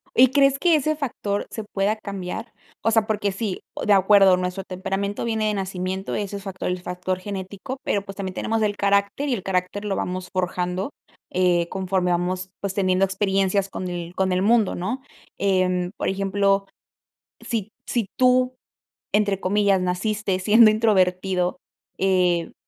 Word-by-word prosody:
¿Y 255 +2 +8
crees 275 -1 +4
que 345 -2 +4
ese 310 +1 +1
factor 215 -8 -3
se 220 - -5
pueda 205 +1 0
cambiar? 200 +2 -6 0.3
O 225 - +3
sea, 225 -1 +3
porque 205 -2 0
sí 200 -1 -3
oh, - - -4
de 210 - +5
acuerdo, 195 -1 +6
nuestro 180 +1 -3
temperamento 195 +2 -3
viene 220 -2 0
de 210 - +1
nacimiento, 190 0 -3
ese 200 -1 -3
es 195 - -10
facto 190 -2 -6
el 180 0 -1
factor 180 +1 -3
genético, 200 +6 -6
pero, 200 - 0
pues, 195 0 -9
también 190 -2 -4
tenemos 225 +3 -1
el 205 -1 +1
carácter, 200 +7 +1
y 255 - +2
el 195 -5 -3
carácter 190 +2 -2
lo 195 - -1
vamos 180 0 -3
forjando, 180 +3 -1 0.4
eh, 175 -2 +2
conforme 185 -1 0
vamos, 180 +1 -1
pues, 200 -1 -2
teniendo 190 -1 +2
experiencias 195 0 +1
con 185 - -5
el 175 -1 -5
con 190 -1 +1
el 180 - +1
mundo, 220 0 +3
¿no? 190 +9 -3 0.4
Em, 185 -2 +1
por - - -2
ejemplo, 195 0 +1 0.8
si 225 -3 -2
t 210 - -30 0.2
si 235 -5 0
tú, 255 0 +4 0.6
entre 205 -2 +2
comillas, 200 0 +2
"naciste 190 +2 -1
siendo 215 +3 +7
introvertido", 185 -4 +1 0.4
eh, 180 -3 +2
195 Hz, 165 wpm, -23 LUFS, 185-210 Hz, 0.8 s, Y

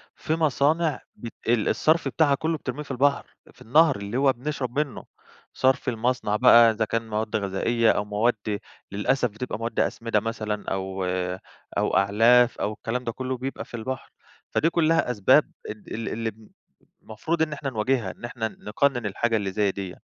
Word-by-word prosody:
في 160 - -2
مصانع 155 0 +1
بت 115 - -8
ال 115 -2 +2
الصرف 160 +2 +2
بتاعها 145 -4 +3
كله 160 +2 -1
بترميه 140 +2 -5
في 140 - -9
البحر، 140 +2 +1 0.3
في - - -24
النهر 150 +4 +4
اللي 100 +4 -4
هو 135 -1 +4
بنشرب 135 0 -3
منه، 145 -3 -3 0.5
صرف 130 0 +1
المصنع 120 -2 -1
بقى 115 +1 +7
إذا 110 0 -1
كان 115 0 -3
مواد 110 0 -2
غذائية 110 +3 +1
أو 105 - -1
مواد 105 0 -1 0.3
للأسف 120 +5 +1
بتبقى 110 +1 -5
مواد 115 +1 -3
أسمدة 115 -2 0
مثلًا 110 -1 -4
أو 95 0 -3 0.7
أو - - +1
أعلاف 115 +5 +4
أو 105 - -1
الكلام 120 +4 -4
ده 115 - -2
كله 130 +1 -4
بيبقى 135 +2 -5
في - - -22
البحر، 130 +4 -5 0.4
فدي 165 - +2
كلها 165 -6 +2
أسباب 100 -5 +4 0.2
ال 105 -1 -8
ال 115 +1 -4
اللي 115 0 -3
بن 110 +1 -19 0.5
المفروض 155 +10 -3
إن 155 -1 +1
إحنا 140 -2 -4
نواجهها، 115 -3 0
إن - - -10
إحنا 115 -2 -3
نقنن 120 +3 -1
الحاجة 115 +3 0
اللي 100 -2 -2
زي 100 0 +1
ديّة. 95 -2 -6
115 Hz, 175 wpm, -25 LUFS, 105-135 Hz, 0.7 s, بقى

